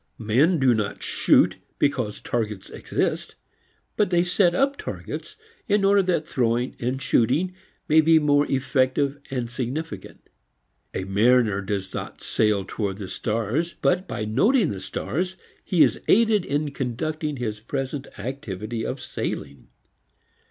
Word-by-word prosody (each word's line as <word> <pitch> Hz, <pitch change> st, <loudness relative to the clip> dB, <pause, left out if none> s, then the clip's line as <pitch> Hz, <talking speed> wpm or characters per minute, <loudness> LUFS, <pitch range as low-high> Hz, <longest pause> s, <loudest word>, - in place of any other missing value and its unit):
Men 130 Hz, +11 st, +3 dB
do 130 Hz, -4 st, +4 dB
not 105 Hz, -3 st, -2 dB
shoot -, -, +3 dB, 0.2 s
because 125 Hz, -7 st, 0 dB
targets 105 Hz, -5 st, -3 dB
exist, -, -, -2 dB, 0.6 s
but 210 Hz, -, +2 dB
they 175 Hz, -1 st, +3 dB
set 180 Hz, 0 st, +2 dB
up 275 Hz, +4 st, +2 dB
targets -, -, -6 dB, 0.3 s
in 205 Hz, -1 st, +3 dB
order 200 Hz, 0 st, +5 dB
that 175 Hz, -4 st, 0 dB
throwing 120 Hz, 0 st, 0 dB
and 125 Hz, +2 st, -1 dB
shooting 135 Hz, +7 st, +2 dB, 0.3 s
may 155 Hz, +1 st, +6 dB
be 160 Hz, +1 st, +5 dB
more 145 Hz, -1 st, +3 dB
effective 135 Hz, +1 st, +1 dB
and 125 Hz, -4 st, -2 dB
significant. 130 Hz, +7 st, -5 dB, 0.7 s
A 95 Hz, -, -1 dB
mariner 105 Hz, +1 st, +3 dB
does 95 Hz, -1 st, -3 dB
not -, -, -6 dB
sail 105 Hz, -3 st, +1 dB
towards 100 Hz, -2 st, -3 dB
the 100 Hz, -, -5 dB
stars, 115 Hz, +10 st, -1 dB
but 180 Hz, +1 st, +1 dB
by 105 Hz, -, -3 dB
noting 180 Hz, -, +3 dB
the 95 Hz, -, -5 dB
stars 180 Hz, -, -3 dB, 0.3 s
he 175 Hz, -4 st, +4 dB
is -, -, +1 dB
aided 220 Hz, -3 st, +4 dB
in 145 Hz, +1 st, -1 dB
conducting 150 Hz, +4 st, -3 dB
his 110 Hz, -4 st, -3 dB
present 135 Hz, +4 st, -4 dB
activity 110 Hz, -2 st, -5 dB
of 130 Hz, -, -3 dB
sailing. 70 Hz, -, -5 dB
130 Hz, 140 wpm, -24 LUFS, 110-160 Hz, 0.7 s, may